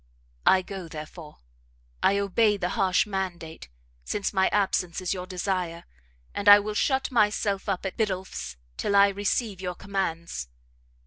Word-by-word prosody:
I 185 -1 +6
go, 190 -2 -7
therefore, 155 - -10 0.6
I 200 - +3
obey 205 +2 +2
the 180 -2 -2
harsh 185 -1 +2
mandate, 180 - -5 0.3
since 205 - -2
my 190 -1 +3
absence 190 -4 0
is 185 -1 -1
your 180 -1 -6
desire, 180 -2 -2 0.5
and 205 0 +2
I 205 - +12
will 210 +1 -4
shut 265 +4 +1
myself 210 -3 +1
up 195 0 -2
at 190 - -4
Biddulph's 185 - -3 0.2
till 200 - 0
I 200 0 +7
receive 200 0 -1
your 180 -1 -3
commands. 170 - -3
190 Hz, 145 wpm, -26 LUFS, 180-205 Hz, 0.6 s, I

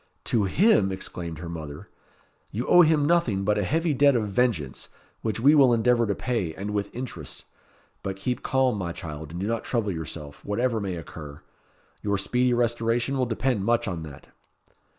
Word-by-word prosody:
"To 110 -4 +1
him!" 110 - +4
exclaimed 85 -3 -5
her 85 +2 -7
mother. 75 -4 -7 0.6
"You 115 +5 -3
owe 175 - +7
him 155 -3 +4
nothing 145 - +2
but 105 +1 +2
a - - +1
heavy 160 - +1
debt 140 0 +4
of 110 -3 0
vengeance, 100 - -1 0.3
which 110 -1 -2
we 140 +6 +6
will 135 -5 +6
endeavour 120 0 +3
to 100 - 0
pay, 110 -11 -2
and 100 +2 -4
with 100 -1 -2
interest. 125 +1 -7 0.6
But 95 -1 -4
keep 125 +6 -3
calm, 130 -5 +1
my 85 -2 -3
child, 80 -4 -7
and 85 +2 -6
do 95 - -2
not 115 +2 -1
trouble 115 -5 -1
yourself; 80 -3 -7
whatever 115 +2 0
may 95 -3 -3
occur. 75 -3 -9 0.6
Your 100 -1 0
speedy 125 +6 +1
restoration 120 +2 +1
will 130 -2 +1
depend 115 -2 0
much 120 +2 +1
on 90 -4 -3
that." 75 -3 -11
110 Hz, 180 wpm, -26 LUFS, 90-125 Hz, 0.6 s, owe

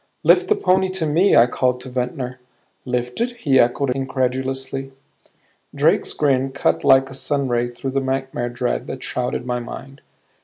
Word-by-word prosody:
"Lift - - +5
the 425 - +3
pony 190 - +2
to 185 -3 -1
me," 165 +6 +3
I 115 - +7
called 125 0 0
to 130 - -8
Ventnor. 125 0 -4 0.5
"Lift 125 - -2
it?" 240 0 -1
he 135 -3 +3
echoed, 125 +3 +2
incredulously. 135 0 -2 0.8
Drake's - - +2
grin 135 -2 +1
cut - - 0
like 135 -1 +5
a - - -8
sunray 130 -3 -1
through 125 +2 -5
the 135 - 0
nightmare 130 -2 -2
dread 120 0 -2
that 130 - -6
shrouded 125 -1 -3
my 125 -1 -2
mind. 135 +3 -9
130 Hz, 160 wpm, -21 LUFS, 125-135 Hz, 0.8 s, I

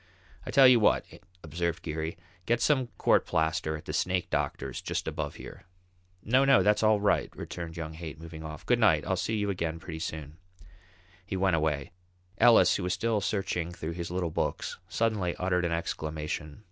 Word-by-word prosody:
"I - - -4
tell 135 -2 +7
you 125 -2 +7
what," 105 - +3 0.4
observed 85 +2 -3
Geary; 80 +2 -4 0.3
"get 120 0 +2
some 130 0 +2
court - - +4
plaster 80 -1 0
at 75 - -13
the - - -5
snake 90 -1 0
doctor's 65 -2 -2
just - - -3
above - - -3
here." - - -10 0.6
"No, 130 +5 +4
no, 135 0 +5
that's 105 0 +3
all 110 -1 +4
right," 100 0 +2
returned 85 -1 -7
young 80 -1 -5
Haight, 80 -1 -8
moving 80 -1 -9
off. 75 -1 -8
"Good - - +3
night. - - +4
I'll - - 0
see 110 - -1
you 105 -1 0
again 85 -3 -2
pretty 80 -1 -7
soon." 80 -1 -6 0.9
He 95 0 -4
went 95 -2 +2
away. 75 -3 -1 0.5
Ellis, 120 -2 +6
who - - -4
was 90 0 0
still 110 +2 0
searching 90 -3 -2
through 85 -2 -5
his 85 0 -5
little 90 -2 -2
books, - - -2
suddenly 105 -6 0
uttered 90 -1 0
an 85 - -1
exclamation. 80 -2 -4
85 Hz, 185 wpm, -29 LUFS, 80-100 Hz, 0.9 s, tell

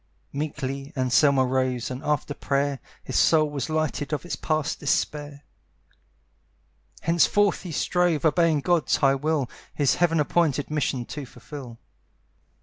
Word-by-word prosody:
Meekly 140 -1 -4
Anselmo 130 +2 +4
rose, 130 -1 -1
and, 130 +1 -5
after 150 -1 -1
prayer, 140 -1 -1 0.2
His - - -6
soul 155 -2 +4
was 145 0 -4
lightened 155 -3 -1
of 150 +2 -2
its 175 - -3
past 155 -2 -1
despair. 145 0 -2 1.6
Henceforth 180 +5 +3
he 180 - -7
strove, 175 -1 +1
obeying 160 -1 +3
God's 175 0 +2
high 135 -2 +3
will, 145 -1 0 0.3
His 145 -4 +3
heaven 165 -2 +2
appointed 150 -2 +1
mission 135 -5 -1
to 140 0 -7
fulfil. 125 -3 -10
145 Hz, 130 wpm, -25 LUFS, 135-155 Hz, 1.6 s, Anselmo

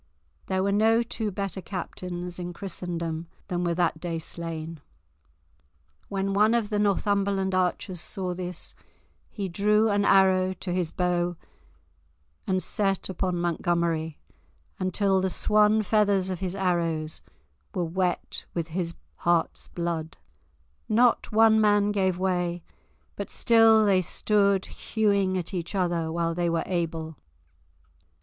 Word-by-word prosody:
There 190 0 0
were 200 - +1
no 225 +3 +4
two 225 -2 -3
better 195 -1 -4
captains 180 -1 -5
in 175 0 -5
Christendom 170 -3 -4 0.2
than 180 -1 -1
were 170 -1 0
that 170 -2 +1
day 170 -1 -3
slain. 165 -1 -6 1.3
When 195 0 -1
one 210 +3 +4
of 225 -2 0
the 210 - +1
Northumberland 200 -1 +1
archers 185 -1 -1
saw 185 -1 -3
this, 180 -1 -4 0.6
he 200 -3 -4
drew 210 +4 +2
an 205 0 +2
arrow 190 -1 +4
to 180 -1 -5
his 180 -3 0
bow 175 -1 0 1.1
and 185 -1 +1
set 195 -3 0
upon 185 -1 -1
Montgomery, 170 -2 0 0.6
until 190 +1 +1
the 190 - +1
swan 210 +3 +3
feathers 200 -3 +2
of 180 - -4
his 185 0 -3
arrows 165 -5 -1 0.5
were 180 - 0
wet 180 +2 -2
with 165 -1 -2
his 170 0 -3 0.2
heart's 170 -1 0
blood. 170 -2 -4 0.7
Not 235 +2 +3
one 220 0 +5
man 205 -1 +3
gave 190 -3 +1
way, 180 -2 -1 0.5
but - - -5
still 225 -2 +5
they 195 -2 +4
stood 200 +2 +2
hewing 200 -4 0
at 180 +1 -4
each 175 +2 -4
other, 170 -3 0
while 165 0 0
they 175 0 0
were 165 -1 0
able. 165 -3 -3
185 Hz, 130 wpm, -26 LUFS, 170-200 Hz, 1.3 s, one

